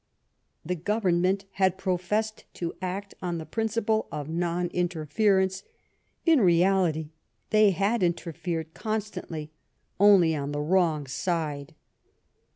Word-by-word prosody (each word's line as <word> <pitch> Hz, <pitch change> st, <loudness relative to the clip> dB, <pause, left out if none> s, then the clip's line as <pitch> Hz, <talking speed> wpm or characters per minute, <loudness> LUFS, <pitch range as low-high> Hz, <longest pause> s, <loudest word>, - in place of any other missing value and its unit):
The 180 Hz, -, -1 dB
Government 190 Hz, 0 st, +1 dB
had 190 Hz, -1 st, +1 dB
professed 195 Hz, +4 st, -1 dB
to 170 Hz, -1 st, -3 dB
act 195 Hz, +2 st, -4 dB
on 175 Hz, -2 st, -2 dB
the 160 Hz, -, -6 dB
principle 220 Hz, +1 st, 0 dB
of 145 Hz, -1 st, -5 dB
non 175 Hz, +1 st, -1 dB
interference; 185 Hz, +3 st, +1 dB, 0.6 s
in 325 Hz, -6 st, +5 dB
reality, 175 Hz, -4 st, +3 dB, 0.4 s
they 215 Hz, -1 st, +6 dB
had 200 Hz, +4 st, +1 dB
interfered 170 Hz, -2 st, -2 dB
con 220 Hz, -1 st, -1 dB
stantly, 160 Hz, -7 st, -7 dB, 0.5 s
only 190 Hz, -5 st, +6 dB
on 145 Hz, 0 st, -3 dB
the 145 Hz, -, -2 dB
wrong 160 Hz, -2 st, +2 dB
side." 145 Hz, 0 st, -3 dB
180 Hz, 115 wpm, -27 LUFS, 165-200 Hz, 0.6 s, they